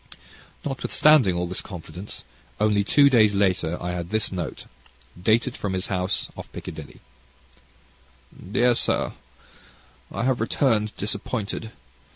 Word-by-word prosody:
Notwithstanding 135 - +4
all 90 0 -1
this 90 +1 -3
confidence, 90 +1 -8 0.4
only 105 -1 +3
two 140 +7 +5
days 110 -6 +5
later 90 -4 +1
I 90 - -3
had 85 -1 -4
this 110 +1 +1
note, 90 -4 -5 0.6
dated 115 +6 +2
from 100 -2 -3
his 95 +1 -2
house 95 +1 -1
off - - -9
Piccadilly: - - -9 1.5
Dear 120 +3 +4
Sir, - - +1 1.0
I - - -3
have 130 -2 +1
returned 110 -3 +1
disappointed. 105 +2 -3
105 Hz, 120 wpm, -24 LUFS, 90-120 Hz, 1.5 s, two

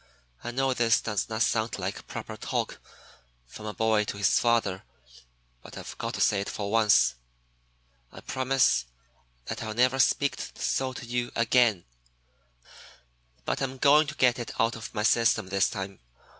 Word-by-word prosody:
"I 120 - -4
know 135 +2 0
this 115 -2 +3
does 105 -2 -2
not 110 0 +1
sound 110 0 0
like 95 +1 -5
proper - - -7
talk - - -3 0.7
from 105 - -10
a 105 - -4
boy 110 -1 +2
to 100 - -5
his 100 -2 +3
father; 115 -6 +1 0.8
but - - -12
I've - - -8
got - - -3
to - - -3
say 100 -2 +3
it 100 - -5
for 100 -1 -4
once. 110 - +4 1.0
I - - -12
promise 130 - +1 0.6
that - - -5
I'll 110 -1 -5
never 130 +2 +2
speak 140 +1 +2 0.2
so 130 -1 -1
to 125 - -8
you 120 0 -2
again, 115 -5 +3 1.6
but - - -2
I'm 135 -1 -3
going 150 +3 +5
to 150 - -6
get 125 -3 +3
it 120 - -7
out 115 +1 +2
of 115 - -8
my 105 - -1
system 115 -4 +2
this 100 0 +2
time. 95 -2 -6
115 Hz, 165 wpm, -27 LUFS, 105-125 Hz, 1.6 s, going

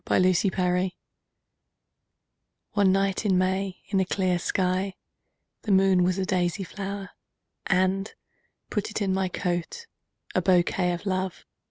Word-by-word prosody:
My 185 0 +4
Flower 180 0 +1 1.8
ONE 200 -2 +3
night 195 +1 +1
in 195 -4 +3
May 190 +1 -1
in 200 -2 +2
a 190 - +2
clear 180 -1 0
skyThe 185 +2 0 0.7
moon 190 -2 +4
was 180 +1 +1
a 190 - 0
daisy 185 0 0
flower:And! 195 0 -3 0.6
put 210 -2 -1
it 215 - -3
in 195 -3 0
my 190 0 +1
coat,A 180 - -4
bouquet 180 -1 +2
of 175 - -6
Love! 185 -2 -2
190 Hz, 120 wpm, -26 LUFS, 180-195 Hz, 1.8 s, My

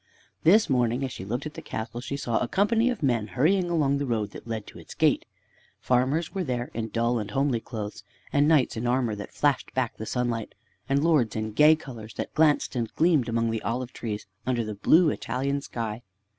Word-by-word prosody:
This 205 +7 +5
morning, 125 0 +1
as 130 - -2
she 95 - -7
looked 120 +8 -3
at 155 - -5
the - - -8
castle, 115 +2 -5
she 140 +2 -4
saw 120 -5 0
a - - -1
company 225 - +2
of 245 -10 -3
men 120 -6 +1
hurrying 175 - +2
along 140 -5 +2
the 140 - -2
road 110 -4 -1
that - - -11
led 110 -2 -4
to - - -12
its - - -11
gate. - - +2 0.5
Farmers 130 +7 +1
were 190 -2 -1
there 125 -5 -3
in 115 -1 -3
dull 115 +1 0
and 105 -1 -5
homely 135 +1 +1
clothes, 105 -4 -6 0.3
and 145 +1 +4
knights 155 -5 +3
in 115 +2 -2
armor 120 -2 +1
that 100 -1 -7
flashed 145 -2 0
back 130 -3 -1
the 110 - -6
sunlight, 120 -2 -2 0.3
and 140 +1 +2
lords 150 -10 +3
in 110 0 -2
gay 150 +8 +6
colors 120 -8 -10
that - - -5
glanced 150 -3 +3
and 115 -3 -2
gleamed 155 -7 +3
among 115 0 +1
the 115 - -2
olive 125 +2 -3
trees 105 -3 -5 0.2
under 120 0 0
the 110 - -4
blue 155 - +4
Italian 140 +2 -2
sky. 115 -3 -4
125 Hz, 210 wpm, -26 LUFS, 115-145 Hz, 0.5 s, gay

